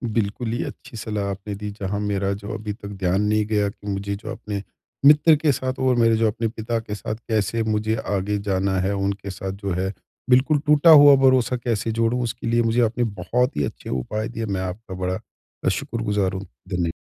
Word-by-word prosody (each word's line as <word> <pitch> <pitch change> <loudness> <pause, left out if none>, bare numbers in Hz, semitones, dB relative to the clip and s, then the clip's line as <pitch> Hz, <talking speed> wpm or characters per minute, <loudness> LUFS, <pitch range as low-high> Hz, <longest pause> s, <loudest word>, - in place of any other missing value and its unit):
बिल्कुल 110 +1 -1
ही 120 - -1
अच्छी 115 - -9
सलाह 105 -2 -3
आपने 100 +1 -6
दी 105 +1 -5
जहाँ 100 +1 -2
मेरा 100 -1 -1
जो 100 +1 -6
अभी 105 0 -4
तक 100 -1 -10
ध्यान 95 -1 0
नहीं 105 0 +2
गया 105 -2 +1
कि 105 0 -13
मुझे 100 0 -2
जो 110 +2 -7
अपने 105 -3 -5 0.4
मित्र 150 +2 +7
के 150 0 +2
साथ 130 0 -3
और 130 -1 +3
मेरे 115 -1 +4
जो 115 0 +3
अपने 115 +2 -1
पिता 115 +1 -3
के 105 -2 -6
साथ 110 +1 -4
कैसे 110 +1 0
मुझे 110 0 0
आगे 105 +1 -1
जाना 95 0 +1
है। 95 +2 0
उनके 100 0 -2
साथ 95 0 -5
जो 100 - -1
है 95 +1 -1 0.4
बिल्कुल 135 +4 +4
टूटा 150 +2 +5
हुआ 145 -2 +10
भरोसा 130 -1 +3
कैसे 115 -2 -1
जोड़ूँ 115 +2 +1
उसके 115 0 -4
लिए 120 +1 +3
मुझे 115 +2 +2
आपने 120 +1 +1
बहुत 115 +4 -1
ही 75 - +1
अच्छे - - -7
उपाय 105 - -2
दिए 115 -1 -4
मैं 95 -3 -2
आपका 95 +2 -6
बड़ा 90 0 -2 0.5
शुक्रगुज़ार 105 -5 -1
हूँ 95 +1 -5 0.2
धन्य 90 -3 0
105 Hz, 205 wpm, -23 LUFS, 100-115 Hz, 0.5 s, हुआ